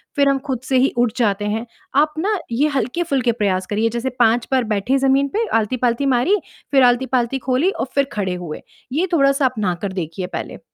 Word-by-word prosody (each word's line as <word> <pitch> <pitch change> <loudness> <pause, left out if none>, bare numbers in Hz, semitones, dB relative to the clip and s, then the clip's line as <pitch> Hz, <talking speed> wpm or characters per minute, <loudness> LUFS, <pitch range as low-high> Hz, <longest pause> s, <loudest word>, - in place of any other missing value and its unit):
फ़िर 285 -2 +3
हम 275 - +2
ख़ुद 260 -3 -1
से 260 0 +1
ही 260 +2 +3
उठ 240 -1 +2
जाते 205 -4 +1
हैं। 220 +3 -2 0.4
आप 305 0 +1
ना 410 +5 0
ये 270 +6 +2
हल्के-फुल्के 270 -3 0
प्रयास 195 -5 0
करिए, 215 +2 0
जैसे 240 +3 -2
5 235 0 +3
बार 260 -1 +3
बैठे 210 +7 +1
जमीन 275 +1 +3
पे, 455 +2 +1
आलती-पालती 240 +4 0
मारी, 290 +12 +3 0.4
फ़िर 270 -2 +5
आलती-पालती 250 +1 +2
खोली 260 +9 +3
और - - -3
फ़िर 280 0 +3
खड़े 190 -3 -1
हुए। 155 - -6 0.3
ये 340 +6 +1
थोड़ा-सा 275 -3 +3
अपनाकर 200 -6 -1
देखिए 180 0 -4
पहले। - - -6
250 Hz, 190 wpm, -20 LUFS, 215-275 Hz, 0.4 s, फ़िर